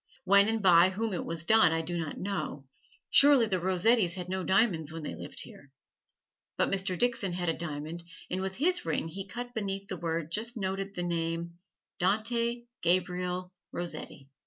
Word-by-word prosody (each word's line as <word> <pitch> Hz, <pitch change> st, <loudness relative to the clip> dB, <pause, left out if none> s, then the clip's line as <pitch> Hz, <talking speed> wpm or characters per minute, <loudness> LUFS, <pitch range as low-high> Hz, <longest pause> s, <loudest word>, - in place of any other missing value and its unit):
When 200 Hz, +2 st, +5 dB
and 220 Hz, -1 st, 0 dB
by 175 Hz, -1 st, +7 dB
whom 215 Hz, +3 st, -2 dB
it 180 Hz, -, -2 dB
was 165 Hz, 0 st, -4 dB
done 220 Hz, -4 st, +6 dB
I 165 Hz, 0 st, +1 dB
do 175 Hz, +2 st, -2 dB
not 160 Hz, -3 st, -3 dB
know. 155 Hz, -8 st, -4 dB, 0.5 s
Surely 280 Hz, -4 st, +6 dB
the 190 Hz, -4 st, 0 dB
Rossettis 185 Hz, +1 st, +3 dB
had 180 Hz, -1 st, -6 dB
no 190 Hz, 0 st, -2 dB
diamonds 180 Hz, -6 st, +2 dB
when 165 Hz, -1 st, -7 dB
they -, -, -4 dB
lived -, -, -5 dB
here. 145 Hz, -, -14 dB, 0.9 s
But -, -, +1 dB
Mr. 190 Hz, -2 st, 0 dB
Dixon 235 Hz, -5 st, 0 dB
had 175 Hz, -1 st, -1 dB
a -, -, +2 dB
diamond 160 Hz, +1 st, -5 dB, 0.3 s
and 185 Hz, +1 st, -2 dB
with 190 Hz, 0 st, -3 dB
his 350 Hz, -, +2 dB
ring -, -, -1 dB
he 195 Hz, +4 st, -6 dB
cut 245 Hz, +4 st, -6 dB
beneath 195 Hz, -2 st, -3 dB
the -, -, -3 dB
word 165 Hz, -1 st, -2 dB
just 230 Hz, +5 st, 0 dB
noted 195 Hz, 0 st, -3 dB
the 175 Hz, -, -2 dB
name, 170 Hz, 0 st, -2 dB, 0.4 s
"Dante 230 Hz, +5 st, +1 dB, 0.2 s
Gabriel 180 Hz, +1 st, 0 dB, 0.2 s
Rossetti." 170 Hz, -5 st, -5 dB
185 Hz, 180 wpm, -30 LUFS, 170-210 Hz, 0.9 s, by